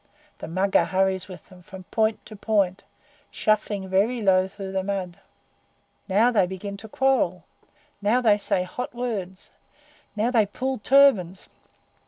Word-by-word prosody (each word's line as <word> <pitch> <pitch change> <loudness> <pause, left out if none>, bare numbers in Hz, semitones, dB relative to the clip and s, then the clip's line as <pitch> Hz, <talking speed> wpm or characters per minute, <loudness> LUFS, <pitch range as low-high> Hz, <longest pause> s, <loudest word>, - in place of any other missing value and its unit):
The - - -7
Mugger 190 +4 +2
hurries 190 0 0
with 185 -3 -12
them 185 -1 -16
from 185 +1 -11
point 220 -1 0
to 215 - -11
point, 200 -3 0 0.5
shuffling 210 -2 -1
very 205 +6 +1
low 185 -1 +3
through 195 0 -8
the 190 0 -1
mud. 190 -3 -4 0.9
Now 215 +6 +4
they 205 -6 +2
begin 195 +2 -6
to 220 - -11
quarrel! 225 -10 +1 0.6
Now 215 +5 +2
they 215 -4 +3
say 185 -2 0
hot 245 +7 -6
words! 200 -7 -5 0.6
Now 220 +3 0
they 220 -5 +3
pull 260 +5 -3
turbans! 210 -8 +3
200 Hz, 145 wpm, -24 LUFS, 190-220 Hz, 0.9 s, Now